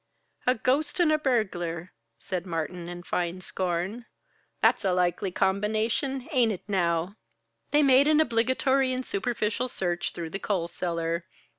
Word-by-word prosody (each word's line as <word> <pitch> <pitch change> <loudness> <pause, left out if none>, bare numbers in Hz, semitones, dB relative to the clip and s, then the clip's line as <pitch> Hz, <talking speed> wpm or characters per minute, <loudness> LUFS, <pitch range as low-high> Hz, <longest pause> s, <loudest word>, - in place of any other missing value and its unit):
"A 250 - +5
ghost 285 +8 0
and 340 -3 +4
a 310 - +3
burglar!" 185 - -1 0.3
said 185 -1 -4
Martin, 170 +1 -3
in 175 0 -7
fine 175 0 -2
scorn. 185 +5 -3 0.5
"That's - - +3
a 190 -2 +2
likely 180 +1 +1
combination, 220 - 0
ain't 245 -6 +3
it 190 - -5
now?" 175 0 0 0.5
They 295 +1 +4
made 270 +1 +6
an 305 0 +5
obligatory 260 +1 +2
and 255 0 -3
superficial 225 +3 -1
search 175 -7 -2
through 165 -2 -5
the 195 - -3
coal 190 -5 -1
cellar. 170 -1 -2
200 Hz, 145 wpm, -27 LUFS, 175-255 Hz, 0.5 s, made